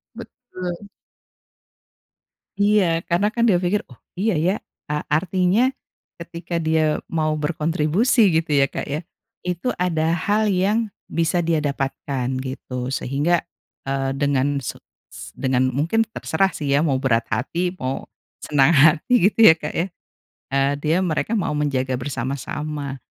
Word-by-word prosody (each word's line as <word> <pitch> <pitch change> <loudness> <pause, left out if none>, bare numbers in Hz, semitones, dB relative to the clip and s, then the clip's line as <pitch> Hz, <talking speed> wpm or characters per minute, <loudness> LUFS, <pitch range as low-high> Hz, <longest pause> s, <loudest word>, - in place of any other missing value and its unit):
Betul. 185 -5 -8 1.7
Iya 195 -5 +3
karena 180 +5 +2
kan 235 - +1
dia 180 - +4
pikir 180 +3 0
oh 125 - -15 0.2
iya 205 +4 0
ya 175 +5 +2 0.3
a 150 0 -2
artinya, 185 - +2 0.5
ketika 170 0 -4
dia 160 -1 +1
mau 155 -1 0
berkontribusi 165 - +2
gitu 160 -1 0
ya 135 - +2
Kak - - -4
ya, 150 +3 -3 0.4
itu 180 +7 -2
ada 165 -2 0
hal 205 +6 +1
yang 205 +3 +1 0.2
bisa 165 +1 +1
dia 165 -1 +1
dapatkan 135 -2 -2 0.2
gitu 130 0 -5
sehingga, 145 +7 +1 0.5
eee, 135 0 -1
dengan 140 0 0
se - - -5 0.4
es - - -9
dengan 130 -1 +1
mungkin 170 - +1
terserah 190 +4 +1
sih 145 -2 -4
ya 145 - +4
mau 135 -3 +1
berat 115 -4 +1
hati 170 +10 -1
mau, 130 +1 -3 0.4
senang 140 -1 +4
hati 155 +9 +4 0.2
gitu - - -13
ya 160 - +7
Kak 150 -1 -5
ya, 170 - 0 0.7
eee, 135 +1 +2
dia 155 +3 0
mereka 180 +4 -1
mau 185 -9 0
menjaga 130 -3 0
bersama-sama, 140 +2 -4
155 Hz, 135 wpm, -22 LUFS, 140-180 Hz, 1.7 s, ya